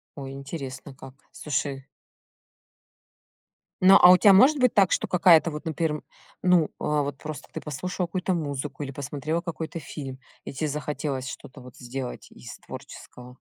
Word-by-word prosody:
О, 140 -2 -7
интересно 135 0 -7
как. 135 -1 -12 0.2
Слушай. 140 -2 -3 2.0
Но, 190 +2 +8
а, 180 - +10
у 185 - +8
тебя 200 -1 +6
может 270 +10 +6
быть 250 -2 +3
так, 195 -3 +4
что - - 0
какая-то 170 -2 +5
вот, 150 +3 -7
например, 160 -1 -1
м, - - -8 0.4
ну, 180 -4 +3
а, 150 -1 0
вот, 140 -1 -5
просто, 155 -1 -8
ты - - -5
послушала 175 +5 -4
какую-то 185 +2 -2
музыку, 145 -2 -4
или 135 - -6
посмотрела 145 +4 -3
какой-то 165 -1 -5
фильм, 135 -3 -8 0.2
и - - -7
тебе 150 +3 -2
захотелось 140 -2 -3
что-то 130 - -10
вот 125 -1 -14
сделать 125 +1 -7
из 60 - -11
творческого? 125 +1 -11
150 Hz, 160 wpm, -25 LUFS, 135-170 Hz, 2.0 s, а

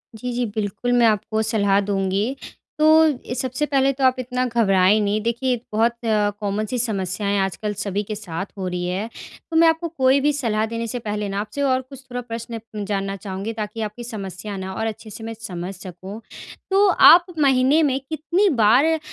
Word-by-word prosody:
जी, 250 +2 -5
जी। 245 0 0
बिल्कुल 215 +3 -2
मैं - - +6
आपको 215 +1 0
सलाह 200 -2 +3
दूँगी। 195 +6 0 0.4
तो 305 - +4 0.4
ये 245 - -4
सबसे 260 +4 -1
पहले 275 -1 +2
तो 265 0 -4
आप 255 0 +5
इतना 255 0 -1
घबराएँ 210 -4 +3
नहीं 205 +1 +1
देखिए 245 +2 0 0.2
बहुत 230 +2 +2 0.5
कॉमन 210 +1 -1
सी 250 - -1
समस्याएँ 200 -2 -1
आजकल 195 +2 -2
सभी 200 +1 -2
के 215 +1 -5
साथ 190 -2 -5
हो 185 -1 -3
रही 180 0 -3
है, 195 +5 -3 0.4
तो - - -3
मैं 330 0 +7
आपको 325 +1 +1
कोई 270 -4 +3
भी 295 +1 +2
सलाह 220 -6 0
देने 230 0 -3
से 245 +2 -4
पहले 210 -2 -3
ना 195 - -2
आपसे 220 +7 -5
और 260 -2 +2
कुछ 260 +1 -13
थोड़ा 245 0 -3
प्रश्न 230 -1 -6 0.2
जानना 195 -1 -2
चाहूँगी 195 +2 -5
ताकि 215 0 -5
आपकी 215 +3 -5
समस्या 200 -3 -6
ना 190 0 -5
और 220 +3 -3
अच्छे 220 0 -7
से 225 - -9
मैं 225 0 -5
समझ 180 -3 -5
सकूँ। 185 +4 -9 0.5
तो 400 +1 +5 0.2
आप 345 +1 +8
महीने 270 +2 +4
में 270 -2 +1
कितनी 340 +6 +1
बार 275 +10 +4
220 Hz, 190 wpm, -22 LUFS, 200-255 Hz, 0.5 s, आप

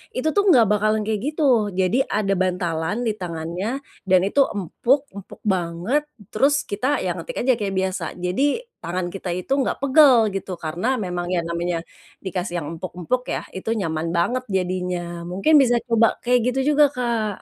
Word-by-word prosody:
itu 255 +4 -1
tuh 405 - +4
enggak 255 - +6
bakalan 215 +1 +2
kayak 215 -1 0
gitu. 305 +1 -3 0.4
Jadi 190 +6 +2 0.2
ada 195 -2 +1
bantalan 175 0 -1
di 220 - +2
tangannya, 170 +2 -4 0.4
dan 185 0 +6
itu 245 - 0 0.2
empuk, 235 - +1 0.2
empuk 200 -2 -10
banget 180 - -1 0.3
terus 275 +7 +3 0.2
kita 210 +6 -2 0.2
ya - - -1
ngetik - - -7
aja 260 - +4
kayak 195 -2 -2
biasa 190 -1 -2 0.2
jadi 180 +10 0 0.4
tangan 175 +1 -3
kita 195 -2 -5
itu 180 - -8
enggak 265 - 0
pegel 275 -2 +6 0.2
gitu 195 0 -4
karena 165 +6 -3 0.2
memang 175 -1 -3
ya 180 - +2
namanya, 170 0 -1 0.5
dikasih 180 -1 -3
yang 145 - -6
empuk-empuk 180 +7 -3
ya - - -2 0.2
itu 190 - -5
nyaman 160 -3 -2
banget 250 +9 +1
jadinya. 180 -1 -2 0.3
Mungkin 195 +13 +1
bisa 245 -2 +3
coba 230 -1 +4 0.2
kayak 250 0 +3
gitu 265 - -2 0.2
juga 295 0 +7
Kak. 230 -5 -1
195 Hz, 170 wpm, -22 LUFS, 180-245 Hz, 0.5 s, juga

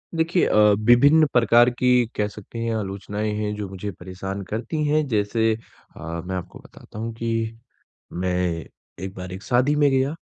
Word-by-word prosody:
देखिए 165 +2 +2
अ, 105 - +3 0.2
विभिन्न 140 +8 +6
प्रकार 120 0 +5
की 125 0 +3
कह 105 - 0
सकते 105 +2 -10
हैं 115 -1 -1
आलोचनाएँ 105 +1 -3
हैं, 105 0 -2
जो 105 -2 -5
मुझे 95 +1 -5
परेशान 95 +2 -6
करती 140 +8 -2
हैं, 155 +1 +2
जैसे 110 0 +1 0.4
अ, - - -12 0.3
मैं 95 0 -3
आपको 90 -1 -7
बताता 105 - -13
हूँ 115 +1 -4
कि 115 0 -2 0.6
मैं 90 -2 -1 0.4
एक 95 - -6
बार 90 0 -7
एक 95 - -7
शादी 130 +4 +2
में 145 -1 +4
गया 135 +2 +1
110 Hz, 170 wpm, -23 LUFS, 95-125 Hz, 0.6 s, विभिन्न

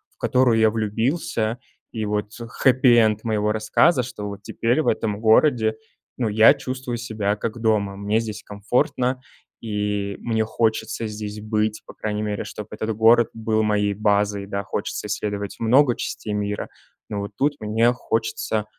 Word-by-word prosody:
в - - -51
которую 125 -3 +3
я 110 0 +5
влюбился, 115 +2 -1 0.3
и 110 -1 -3
вот 105 0 -2 0.3
хеппи-энд 120 -5 +4
моего 105 -1 +1
рассказа, 120 +7 +3
что 115 -4 -6
вот 100 0 -8
теперь 120 +7 0
в - - -3
этом 105 -2 0
городе, 110 0 +4 0.4
ну, 120 -4 0
я 110 +2 +7
чувствую 130 -1 -5
себя 110 -3 -2
как 115 +2 -4
дома. 105 -3 +1
Мне 105 +2 0
здесь 110 -1 -6
комфортно, 125 +5 -1 0.4
и 105 -2 -2
мне 110 -1 0
хочется 110 0 -1
здесь 105 0 -6
быть, 110 0 -1
по - - -12
крайней 105 -1 -3
мере, 105 -1 -2
чтобы 105 - -8
этот 110 +1 -3
город 115 +2 +5
был 110 -1 0
моей 105 -1 +1
базой. 100 -1 +1
Да, 100 0 -3
хочется - - -4
исследовать 100 -1 -3
много 125 +3 +4
частей 105 - -4
мира, 105 0 -3 0.4
но 105 - -3
вот 100 - -6
тут 145 +2 +2
мне 110 +3 +2
хочется 110 -2 -2
110 Hz, 155 wpm, -23 LUFS, 105-115 Hz, 0.4 s, я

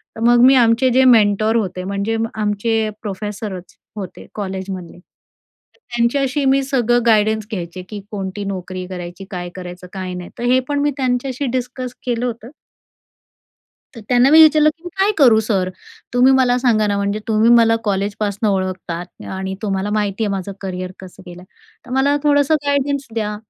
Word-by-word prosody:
तर - - -9
मग 240 0 +5
मी 265 +1 +7
आमचे 235 +1 +4
जे 265 - +5
मेंटर 215 -1 +4
होते, 185 -5 -1
म्हणजे 200 +4 -2 0.2
आमचे 215 +1 0
प्रोफेसरच 205 -2 -6 0.2
होते 195 -4 -8
कॉलेजमधले. 190 -3 -6
तर 175 - -30
त्यांच्याशी 260 - 0
मी 270 +1 +3
सगळं 245 -3 +1
गाईडन्स 220 -1 +2
घ्यायचे 180 -2 -5
की 210 -2 -6
कोणती 195 0 -4
नोकरी 185 -1 -5
करायची? 180 +1 -8
काय 175 -1 -5
करायचं, 180 0 -9
काय 185 -1 -5
नाही, 180 -1 -7
तर 240 - -4
हे 255 - +5
पण 285 0 0
मी 290 0 +1
त्यांच्याशी 255 +1 -1
डिस्कस 250 0 -5
केलं 240 0 -1
होतं. 235 0 -5 1.4
तर 230 - -9
त्यांना 250 +2 +4
मी 315 - +8
विचारलं, 305 -1 +6
की - - -31
"मी - - -4
काय 395 +2 +4
करू 245 -6 +6
सर. 195 -4 0 0.5
तुम्ही 250 +2 +5
मला 255 -2 +3
सांगा 225 -4 +2
ना, 205 - 0
म्हणजे 200 +1 -1
तुम्ही 220 +1 +3
मला 230 -1 +5
कॉलेजपासून 205 +1 -1
ओळखतात 185 -2 -3
आणि 190 0 -4
तुम्हाला 195 -1 -2
माहिती 210 0 -1
आहे - - -1
माझं 195 0 -4
करियर 185 -1 -5
कसं 190 0 -12
गेलं. 175 0 -10 0.4
तर - - -12
मला 280 +2 +2
थोडंसं 290 0 +3
गाईडन्स 280 0 0
द्या. 210 -2 -2
215 Hz, 165 wpm, -19 LUFS, 190-250 Hz, 1.4 s, मी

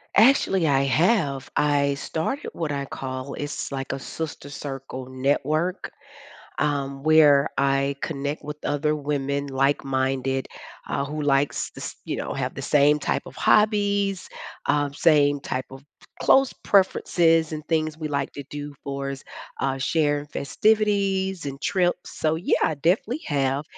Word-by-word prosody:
Actually, 205 -7 +5
I 135 -2 +3
have. 140 - +1
I 140 -1 +2
started 160 - -3
what 165 -3 -3
I 140 -1 -2
call 130 0 -6
it's 145 -1 -4
like 135 -1 -3
a 135 - -4
sister 150 0 -6
circle 135 -2 -6
network, 145 +7 0 0.7
um, 140 -2 -1
where 150 -2 +6
I 140 0 +1
connect 145 -1 -3
with 150 0 -6
other 150 +1 0
women, 140 -1 -2
like-minded, 135 -1 0 0.4
uh, 140 - -1
who 150 +1 -4
likes 140 0 +1
the - - -12
s - - -6
you - - -3
know, - - -4
have - - -3
the - - -6
same 150 +1 +4
type 145 - -1
of - - -11
hobbies, 200 -2 +2 0.4
um, 145 -1 +1
same 145 -1 +3
type 130 -1 -3
of 135 +1 -11 0.4
clothes 270 -1 +4
preferences, 165 -4 +3
and 155 -1 -6
things 155 -1 0
we 155 -1 -4
like 145 -1 -2
to 140 - -7
do 145 0 -6
for 140 0 -3
s 135 -1 -7 0.4
uh, 135 0 0
share 145 +1 +1
festivities 195 +1 +1
and 135 -1 -5
trips, 180 -1 0
so, 155 0 +2
yeah, 165 - +1
I 160 - +2
definitely 190 - 0
have. 140 -1 0
145 Hz, 150 wpm, -24 LUFS, 140-165 Hz, 0.7 s, where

